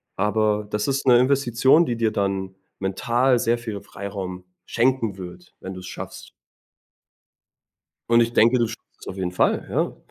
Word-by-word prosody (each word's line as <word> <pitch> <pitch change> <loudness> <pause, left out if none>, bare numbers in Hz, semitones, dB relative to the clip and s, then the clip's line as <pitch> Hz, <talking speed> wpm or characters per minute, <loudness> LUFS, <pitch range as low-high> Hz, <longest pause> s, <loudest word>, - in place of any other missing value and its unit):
Aber 105 +1 +1
das 105 0 -2
ist 135 0 -1
'ne 120 - +7
Investition, 135 +3 +3
die 120 - -2
dir 115 -1 +1
dann 95 -2 -2 0.2
mental 120 +6 +1
sehr 120 +1 +1
viel 110 -4 -6
Freiraum 95 -2 -7 0.2
schenken 120 -4 0
wird, 95 - -10
wenn 95 - -6
du 95 - -8
es 90 - -10
schaffst. - - -8 1.8
Und 115 0 +5
ich 115 0 0
denke, 115 +3 +5
du 120 - +2
schaffst 110 - -8 0.2
es - - -12
auf 95 - -6
jeden 90 -2 -2
Fall, 90 - +1
ja. - - -1
110 Hz, 165 wpm, -23 LUFS, 95-120 Hz, 1.8 s, ne